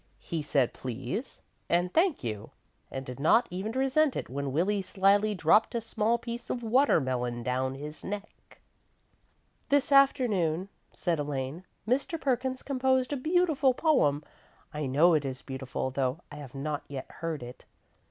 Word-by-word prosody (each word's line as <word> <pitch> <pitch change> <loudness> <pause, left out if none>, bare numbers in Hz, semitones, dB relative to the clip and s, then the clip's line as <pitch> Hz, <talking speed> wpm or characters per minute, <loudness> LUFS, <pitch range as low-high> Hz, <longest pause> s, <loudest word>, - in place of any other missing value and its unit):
He 165 -2 -4
said 140 -4 +1
"please" 130 - -5 0.3
and 175 +1 +1
"thank 330 - +2
you," 110 -3 -4 0.4
and 135 0 -6
did 125 +1 -8
not 165 - +4
even 195 +5 -3
resent 270 +3 +2
it - - -4
when 140 0 -3
Willie 190 +8 +1
slyly 200 +3 +2
dropped 185 +7 +3
a - - +2
small 225 +1 0
piece 235 0 -7
of 240 - -3
watermelon 130 - +2
down 130 +2 -1
his 150 +3 -7
neck. 205 +1 -8 1.1
"This 285 0 +2
afternoon," 205 - +3 0.2
said 170 -3 -1
Elaine, 145 +4 -4 0.2
"Mr. 275 +7 0
Perkins 260 -1 -1
composed 260 0 +1
a - - +1
beautiful 310 -3 +2
poem. 155 - +2 0.5
I 150 -2 -2
know 155 +7 +5
it 155 -2 +2
is 130 -2 -5
beautiful, 130 -1 -4
though 130 +3 -1
I 145 - -8
have 140 -3 -10
not 145 +2 -3
yet 135 -2 -6
heard 165 -5 -3
it. 120 +1 -11
175 Hz, 150 wpm, -29 LUFS, -, 1.1 s, know